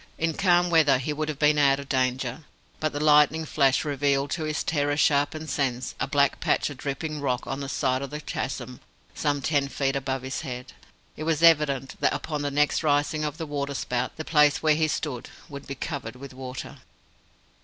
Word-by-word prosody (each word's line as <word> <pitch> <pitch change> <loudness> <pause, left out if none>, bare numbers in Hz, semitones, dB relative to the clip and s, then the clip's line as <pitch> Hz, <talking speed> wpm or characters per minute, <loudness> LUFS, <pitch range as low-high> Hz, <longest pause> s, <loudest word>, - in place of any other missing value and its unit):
In 165 0 0
calm 175 0 +3
weather 150 -5 +5
he 135 +4 -3
would 155 +1 -3
have 150 - -3
been 150 0 +3
out 140 -1 +4
of 140 - -8
danger, 130 +2 -1 0.4
but 155 -1 0
the 145 - -4
lightning 150 +1 +4
flash 140 -1 +2
revealed 140 -1 0
to 160 -2 -2
his 155 -1 -2
terror 145 -2 0
sharpened 150 +2 +2
sense 130 -3 -1
a - - -1
black - - +2
patch - - +1
of 140 - -9
dripping 150 +2 -4
rock 125 -3 -1
on 135 - -4
the 140 -1 -5
side 130 -1 0
of 140 - -5
the 150 - -5
chasm 125 -4 -5 0.3
some 145 -2 -1
ten 145 -3 +1
feet 135 0 -1
above 135 -1 -2
his 130 0 -4
head. 125 -4 -7 0.4
It 155 - -6
was 165 0 0
evident 145 -5 +4
that - - +2
upon 150 -2 -3
the 145 - -1
next 150 +1 +2
rising 145 0 +1
of 150 0 -3
the 160 - -4
water 140 -1 -3
spout 125 -1 -2
the 155 - -5
place 150 -2 +3
where 155 -1 +5
he 155 +1 +2
stood 145 -5 -3 0.2
would 140 -3 -9
be 140 - -5
covered 130 -4 -5
with 135 +1 -10
water. 130 0 -7
145 Hz, 205 wpm, -26 LUFS, 135-155 Hz, 0.4 s, weather